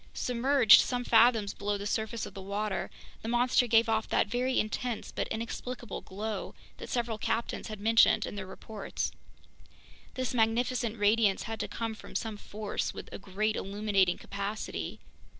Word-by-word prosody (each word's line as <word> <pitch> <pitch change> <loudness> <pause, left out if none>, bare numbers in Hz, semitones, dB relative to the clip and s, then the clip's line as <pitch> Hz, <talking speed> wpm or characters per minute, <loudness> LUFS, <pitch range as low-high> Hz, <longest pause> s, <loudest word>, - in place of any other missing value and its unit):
Submerged 250 -1 +6
some 245 -1 -1
fathoms 225 -3 +4
below 205 0 -2
the 200 - -6
surface 220 +2 -2
of - - -9
the 195 - -8
water, 200 +1 -2 0.3
the - - -6
monster 245 +1 +3
gave 230 0 +5
off 220 -1 0
that - - +3
very 250 +4 0
intense 225 +2 -2
but - - -2
inexplicable 235 +1 -5
glow 205 +1 -5 0.2
that - - -8
several 235 -3 -1
captains 230 +2 -2
had 215 -2 -7
mentioned 220 0 +5
in - - -6
their 200 -2 -6
reports. 210 +2 -5 1.0
This 255 -1 -2
magnificent 235 0 +1
radiance 205 -1 +3
had 225 0 -5
to - - -2
come 225 -1 -3
from 220 - -12
some 220 -3 -2
force 210 0 -4
with - - -8
a - - -6
great 210 +3 -1
illuminating 195 -2 +1
capacity. 200 +2 -4
220 Hz, 160 wpm, -30 LUFS, 205-235 Hz, 1.0 s, Submerged